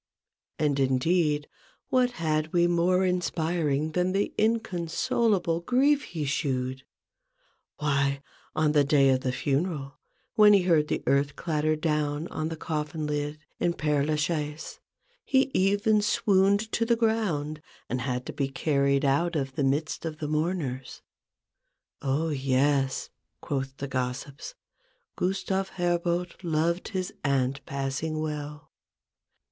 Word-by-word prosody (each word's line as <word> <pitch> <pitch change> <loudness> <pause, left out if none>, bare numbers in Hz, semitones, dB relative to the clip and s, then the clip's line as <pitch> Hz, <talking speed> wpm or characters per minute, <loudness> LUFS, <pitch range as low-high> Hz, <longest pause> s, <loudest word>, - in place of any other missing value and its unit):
And, 145 -2 +1
indeed, 150 +3 +2 0.4
what 250 -1 +2
had 155 -5 -1
we 175 -1 +4
more 175 +2 +2
inspiring 160 -4 0
than 180 +2 0
the 200 +1 0
inconsolable 200 -3 +1
grief 275 +9 +2
he 160 -4 -4
shewed? 130 -2 -1 1.0
Why! 140 -1 0 0.3
on 155 -1 +2
the 150 -1 +4
day 140 -1 +4
of 130 -1 +2
the 130 - -1
funeral, 140 +1 -2 0.3
when 210 -1 +7
he 195 -3 +5
heard 165 -4 +3
the - - -2
earth 140 +1 +2
clatter 155 -2 0
down 150 0 -1
on 155 0 -3
the 160 - -5
coffin 155 0 -3
lid 150 0 -2 0.2
in 170 -1 +1
Pcre 150 -2 +1
la 155 - +1
Chaise, 150 0 -3 0.4
he 265 0 +2
even 205 +3 +3
swooned 200 +1 +2
to 230 - +1
the 235 +1 +3
ground, 195 -10 0 0.3
and 125 +2 -2
had 125 0 -2
to - - -6
be 140 - -1
carried 140 -1 +1
out 165 +6 +2
of 135 -3 -2
the 140 - -1
midst 145 +4 0
of 160 -2 -4
the 150 - -4
mourners. 150 -4 -2 0.5
" - - -54 0.2
Oh, 145 +4 0
yes," 135 -1 +1 0.3
(quoth 135 -1 -3
the 140 - -4
gossips), 130 - -4 0.3
" - - -43
Gustave 190 +1 -1
Herbout 175 0 0
loved 170 +1 0
his 185 -3 -3
aunt 135 -1 0
passing 140 +3 -2
well 150 -1 -5
155 Hz, 135 wpm, -27 LUFS, 140-180 Hz, 1.0 s, when